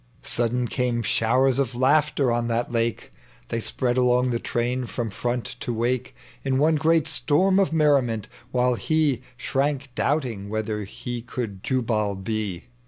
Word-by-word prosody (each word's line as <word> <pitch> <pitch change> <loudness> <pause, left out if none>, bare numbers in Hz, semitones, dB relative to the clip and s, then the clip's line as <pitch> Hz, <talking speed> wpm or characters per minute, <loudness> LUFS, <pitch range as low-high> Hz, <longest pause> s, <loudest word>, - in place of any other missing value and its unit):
Sudden 120 +1 +1
came 120 -1 -1
showers 125 +5 +2
of 130 -3 -1
laughter 140 0 +3
on 120 0 0
that 120 +1 -1
lake; 115 -1 -1 0.4
They 115 - -1
spread 120 +2 -1
along 125 0 +3
the 115 - 0
train 125 +2 -1
tVom 115 -3 -3
iVont 120 +3 -3
to - - -3
wake 120 +2 -1 0.3
In 135 -1 +1
one 155 +3 +3
great 160 0 +3
itorm 185 +5 +3
of 190 - +1
merriment, 135 -9 +2 0.2
while 125 0 +2
he 145 -1 +1 0.2
Shrank 140 +1 -1
doubting 125 -9 -1
whithei 110 -1 -2
he 120 +3 -6
could 115 -5 -5
Jubal 110 -5 0
be. 100 -2 -3
125 Hz, 150 wpm, -24 LUFS, 115-135 Hz, 0.4 s, laughter